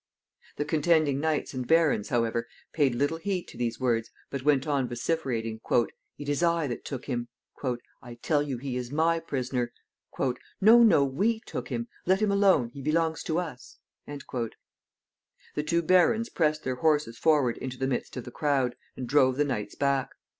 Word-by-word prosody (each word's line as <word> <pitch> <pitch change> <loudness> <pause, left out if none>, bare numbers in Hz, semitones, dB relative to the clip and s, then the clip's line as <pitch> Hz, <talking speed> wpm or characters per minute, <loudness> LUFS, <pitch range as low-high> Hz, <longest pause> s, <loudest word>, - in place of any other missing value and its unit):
The 145 - -2
contending 155 -2 +2
knights 155 -1 -1
and 130 -2 -4
barons, 160 -10 +3
however, 115 -1 0 0.3
paid 140 -6 +2
little 145 +6 0
heed 185 0 -2
to - - -13
these 115 -1 -2
words, 115 -3 0 0.2
but 140 - -3
went 140 -1 +3
on 140 -4 0
vociferating, 120 -4 -2 0.6
"It 145 - -8
is 145 +2 0
I 170 -2 +2
that 120 -4 -4
took 135 -3 -6
him." 120 -3 -3 0.7
"I 120 -1 -10
tell 145 +5 +1
you 140 -3 -3
he 130 0 -4
is 125 0 -5
my 165 +3 +2
prisoner." 130 -5 -2 0.9
"No, 225 +4 +7
no, 205 -11 +6
we 200 - 0
took - - -6
him. 235 0 -3 0.2
Let 190 +1 +4
him 215 -2 +2
alone. 195 -11 +4
He 140 +3 -10
belongs 160 +2 0
to 160 - 0
us." 155 -8 -5 0.3
The 130 -5 -4 1.1
two 170 +2 +1
barons 185 +7 +4
pressed 155 -2 0
their 130 -1 -2
horses 150 -6 +1
forward 145 -7 +3
into 130 -1 -5
the 130 - -1
midst 130 0 -3
of 125 - -4
the 125 - -9
crowd, 135 -3 0 0.2
and 130 - -4
drove 130 -1 +4
the 145 - +3
knights 105 -7 -3
back. 140 -2 +1
140 Hz, 175 wpm, -28 LUFS, 125-160 Hz, 1.1 s, No